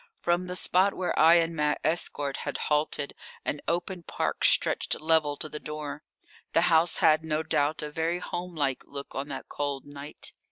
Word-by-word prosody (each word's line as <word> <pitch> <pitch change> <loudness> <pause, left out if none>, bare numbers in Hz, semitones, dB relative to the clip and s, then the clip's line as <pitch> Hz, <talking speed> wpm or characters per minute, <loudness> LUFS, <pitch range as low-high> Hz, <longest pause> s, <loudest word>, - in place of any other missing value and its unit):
From 175 +1 0
the 180 - -4
spot 185 +2 +3
where 185 - -1
I 165 +2 +7
and 165 -1 +2
my 150 -1 +1
escort 145 -3 +1
had - - -4
halted 150 -1 0 0.3
an 145 - -2
open 175 +2 -1
park - - -3
stretched - - +3
level 155 -2 +2
to - - -3
the 150 0 -7
door. 150 -1 -6 0.5
The 165 - +4
house 165 +1 +4
had, 155 0 +5
no 155 0 -1
doubt, 150 -1 0
a 150 - -5
very 165 +3 -1
homelike 170 -7 -3
look 140 0 -8
on 135 +2 -3
that 135 -2 -7
cold 140 -2 -3
night. 145 +1 -7
155 Hz, 175 wpm, -28 LUFS, 145-170 Hz, 0.5 s, I